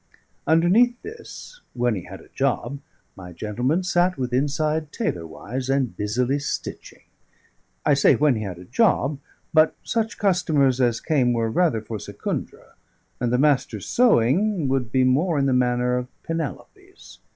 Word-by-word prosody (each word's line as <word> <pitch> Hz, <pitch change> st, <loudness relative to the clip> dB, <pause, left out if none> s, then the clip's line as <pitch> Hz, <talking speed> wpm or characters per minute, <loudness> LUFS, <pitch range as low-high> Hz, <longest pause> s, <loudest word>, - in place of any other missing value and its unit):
Underneath 205 Hz, +10 st, +4 dB
this, 455 Hz, +3 st, -10 dB
when 120 Hz, -1 st, +1 dB
he 95 Hz, -5 st, -5 dB
had -, -, -10 dB
a -, -, -18 dB
job, 140 Hz, -, -2 dB, 0.4 s
my 90 Hz, -2 st, -10 dB
gentleman 120 Hz, -, -1 dB
sat 180 Hz, 0 st, +1 dB
withinside 145 Hz, +4 st, -1 dB
tailor 90 Hz, -, -3 dB
wise 125 Hz, +10 st, -6 dB
and 135 Hz, -7 st, 0 dB
busily 120 Hz, +8 st, 0 dB
stitching. 145 Hz, -, -6 dB, 0.8 s
I 150 Hz, -, +4 dB
say, 140 Hz, -, +5 dB
when 150 Hz, -3 st, +3 dB
he 110 Hz, -, -3 dB
had 95 Hz, -5 st, -5 dB
a 90 Hz, -, -12 dB
job; 145 Hz, -, +1 dB, 0.3 s
but 155 Hz, 0 st, +4 dB
such 225 Hz, 0 st, -2 dB
customers 155 Hz, -, +2 dB
as 120 Hz, -2 st, +2 dB
came 130 Hz, -6 st, +2 dB
were 115 Hz, -1 st, 0 dB
rather 155 Hz, -7 st, +1 dB
for 110 Hz, 0 st, -6 dB
Secundra, -, -, -6 dB, 0.5 s
and 120 Hz, -1 st, -1 dB
the 125 Hz, -, +2 dB
Master's 140 Hz, 0 st, +1 dB
sewing 195 Hz, -, +2 dB
would 130 Hz, -3 st, -1 dB
be 130 Hz, 0 st, +3 dB
more 150 Hz, +6 st, +2 dB
in 140 Hz, -, +2 dB
the 135 Hz, -, +2 dB
manner 125 Hz, 0 st, +1 dB
of 125 Hz, -, -6 dB, 0.2 s
Penelope's. 370 Hz, -, -7 dB
135 Hz, 150 wpm, -23 LUFS, 120-170 Hz, 0.8 s, say